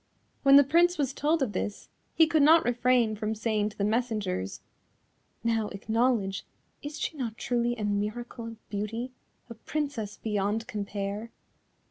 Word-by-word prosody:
When 275 -1 +7
the 285 - +9
Prince 345 +5 +3
was 275 -3 0
told 300 +1 +1
of 240 - -1
this, 205 +2 -4 0.3
he 325 - +7
could 315 -1 +2
not 320 +3 +6
refrain 245 -2 +2
from 215 +1 -2
saying 215 -1 0
to 210 - -17
the 200 - -1
messengers: 210 - -1 0.8
"Now 225 -2 +1
acknowledge, 220 -1 0 0.4
is 290 +1 -6
she - - -2
not 235 -6 -4
truly 240 -1 0
a 220 - -5
miracle 215 +3 -3
of 225 -1 -12
beauty, 225 +5 -3 0.4
a 235 - -8
Princess 230 -3 -4
beyond 210 +1 -1
compare?" 205 +1 -4
225 Hz, 150 wpm, -28 LUFS, 210-260 Hz, 0.8 s, the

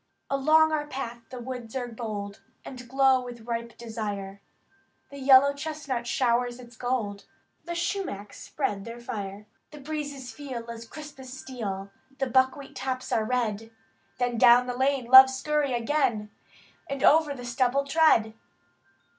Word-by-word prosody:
Along 310 +3 +4
our 300 -1 -1
path 240 -4 -5
the 255 - -7
woods 245 -1 -7
are 250 -2 -2
bold, 215 -4 -6 0.2
And 250 -2 -9
glow 265 -1 +4
with 240 -2 -9
ripe 235 0 -5
desire; 205 -4 -5 0.7
The 280 - -9
yellow 270 +1 +6
chestnut 285 -5 -4
showers 245 0 +1
its 240 -1 -13
gold. 225 -5 -3 0.4
The 345 0 -4
sumachs 345 - -3
spread 205 -9 -3
their 230 +2 -8
fire; 205 -3 -6 0.2
The 300 - -12
breezes 285 -3 -5
feel 250 -5 -7
as 230 0 -9
crisp 300 -1 -10
as 260 -1 -10
steel. 205 -7 -6 0.3
The 270 - 0
buckwheat 260 +2 +1
tops 255 -1 -4
are 220 - +2
red. 225 -2 -1 0.5
Then 245 -2 -1
down 245 0 +7
the 250 -1 -4
lane, 265 0 +1
love, 260 +2 +10
scurry 285 +1 -1
again, 235 -4 0 0.6
And 275 -1 -3
over 305 -2 +5
the 245 -2 -8
stubble 255 +3 +1
tread! 275 -7 +4
250 Hz, 145 wpm, -27 LUFS, 230-275 Hz, 0.7 s, love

